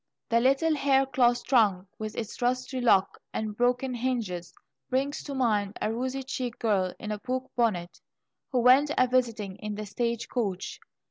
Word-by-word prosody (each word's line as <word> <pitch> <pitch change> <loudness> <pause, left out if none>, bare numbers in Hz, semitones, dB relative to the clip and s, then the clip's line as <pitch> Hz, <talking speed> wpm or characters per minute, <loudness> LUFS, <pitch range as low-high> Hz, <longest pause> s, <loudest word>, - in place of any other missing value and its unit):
The 230 -1 +4
little 275 +6 +3
hair 275 -2 +3
cloth 245 -2 +2
trunk, 205 -7 +3
with 215 -1 -5
its 225 +1 -5
rusty 255 +1 0
lock 195 -5 +3 0.2
and 215 -1 -2
broken 250 +2 +1
hinges, 230 -8 -2 0.4
brings 275 +3 0
to 280 - -5
mind 210 -6 +1
a 220 - -1
rosy 260 +3 -2
cheeked 255 -2 -4
girl 195 -5 +1
in 215 - -6
a 210 - -3
poke 255 +2 -3
bonnet, 195 -8 0 0.5
who 250 -2 +2
went 260 +4 +6
a 255 - +5
visiting 230 -6 0
in 210 -1 -5
the 215 +1 -5
stage 235 +3 -2
coach. 200 -7 -3
240 Hz, 170 wpm, -28 LUFS, 210-255 Hz, 0.5 s, went